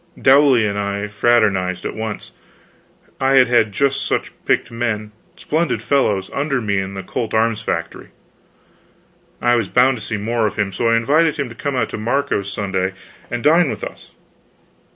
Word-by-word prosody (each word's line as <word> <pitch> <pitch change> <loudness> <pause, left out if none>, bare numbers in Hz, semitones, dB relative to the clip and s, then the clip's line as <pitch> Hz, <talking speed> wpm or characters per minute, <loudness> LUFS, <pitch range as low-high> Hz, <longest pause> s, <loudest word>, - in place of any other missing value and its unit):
Dowley 135 -4 +5
and 100 -1 -2
I 100 +1 -3
fraternized 105 -4 +1
at - - -3
once; 110 -1 -6 0.9
I 135 0 +2
had 130 -2 +6
had 120 -3 +3
just 140 +5 0
such - - -2
picked - - +1
men, 115 -3 -3 0.2
splendid 150 -8 -1
fellows, 105 -9 +1
under 140 -1 -1
me 100 -4 0
in 95 0 -5
the 95 - -5
Colt 115 -2 -3
Arms 115 0 +1
Factory. 85 -6 -4 1.4
I 120 0 +4
was 115 -5 0
bound 125 +1 +3
to - - -9
see 110 - -3
more 110 +2 0
of - - -5
him, 105 -2 -1
so 115 +3 0
I 115 - +4
invited 150 +7 +2
him 140 -4 -2
to 115 - -11
come 140 +3 -3
out 120 -4 0
to - - -6
Marco's 110 -4 -1
Sunday, 95 -2 -2 0.4
and 120 -1 -4
dine 165 +1 +4
with - - -5
us. - - -8
115 Hz, 175 wpm, -19 LUFS, 100-130 Hz, 1.4 s, had